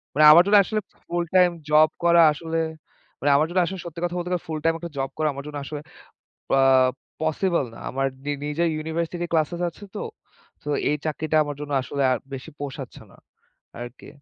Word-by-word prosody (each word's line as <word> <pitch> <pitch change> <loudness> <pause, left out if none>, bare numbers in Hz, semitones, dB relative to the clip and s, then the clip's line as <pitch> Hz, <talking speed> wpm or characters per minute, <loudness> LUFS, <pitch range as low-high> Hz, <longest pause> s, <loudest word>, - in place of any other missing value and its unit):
মানে 155 0 +6
আমার 170 +3 +9
জন্য 205 0 +6
আসলে 215 +2 -2 0.3
ফুল 175 0 -1
টাইম 180 -1 +6 0.2
জব 155 +1 +6
করা 170 0 +6
আসলে, 165 +2 -4 0.6
মানে 145 0 +2
আমার 155 +3 +3
জন্য 185 +1 +1
আসলে 190 +2 -5
সত্যি 170 0 -7
কথা 175 0 -1
বলতে 175 0 -3
গেলে 180 0 -2
ফুল 155 -1 -3
টাইম 165 0 +3
একটা 170 -2 -7
জব 135 0 -1
করা 155 -1 +1
আমার 140 +1 -7
জন্য 145 -1 -6
আসলে 150 0 -6 0.8
আ - - +4 0.6
পসিবল 160 -1 +1
না। - - -11
আমার 135 +1 0 0.2
নি 145 - -1
নিজের 160 +3 0
ইউনিভার্সিটি 165 +2 -3
ক্লাসেস 165 +2 +1
আছে 205 - -16
তো। - - -3 0.6
তো 150 - -5 0.2
এই 150 - +2
চাকরিটা 155 +1 0
আমার 145 -1 -5
জন্য 145 0 -6
আসলে 140 +2 -4
আর 125 - +2 0.2
বেশি 135 +4 -7
পোষাচ্ছে 140 -2 -7
না - - -19 0.6
আরকি। 120 +1 -9
155 Hz, 195 wpm, -24 LUFS, 145-170 Hz, 0.8 s, আমার